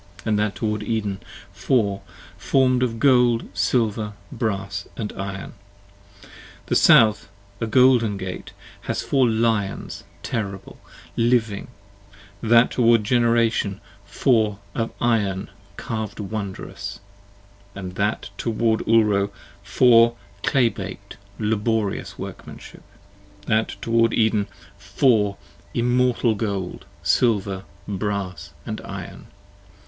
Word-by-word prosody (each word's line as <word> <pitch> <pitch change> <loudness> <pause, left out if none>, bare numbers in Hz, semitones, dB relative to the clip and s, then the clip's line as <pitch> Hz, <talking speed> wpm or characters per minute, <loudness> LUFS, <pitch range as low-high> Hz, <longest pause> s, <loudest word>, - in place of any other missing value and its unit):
13 - - -8
AND 105 -1 +2
that 105 -1 0
toward 105 -1 -2
Eden, 105 -3 -2 0.3
four, 105 -7 0 0.3
form'd 130 -2 +2
of 120 -3 0
gold, 125 -3 +4
silver, 110 -3 0 0.2
brass, 100 -4 -3
& 105 -2 -4
iron. 100 0 -6 1.1
The - - -1
South, 110 -2 +5 0.3
a 115 - -2
golden 120 -3 +4
Gate, 95 -1 -6 0.3
has - - -2
four 130 -3 +2
Lions 110 -3 -1 0.2
terrible, 100 -3 -5 0.4
living: 115 -3 +1 0.7
That 115 +1 +5
toward 115 -2 +4
Generation, 115 -3 +2 0.2
four, 110 -5 +1 0.2
of 115 -1 -1
iron 105 -5 0 0.3
carv'd 110 -2 -4
wondrous: 100 -1 -5 0.8
That 100 +2 -3
toward 115 -1 +1
Ulro, 105 -3 +3 0.3
four, 120 -2 +5 0.3
clay 125 -4 +3
bak'd, - - -8 0.2
laborious 110 -1 -1
workmanship: - - -9 0.6
5 - - -21
That 110 +1 +2 0.2
toward 115 0 +2
Eden, 110 -2 +2 0.3
four, 105 -7 +2 0.4
immortal 125 -1 +2
gold, 100 -4 -4 0.2
silver, 100 -5 +1 0.2
brass 100 -2 -3
& - - -6
iron. - - -8
110 Hz, 100 wpm, -23 LUFS, 100-115 Hz, 1.1 s, South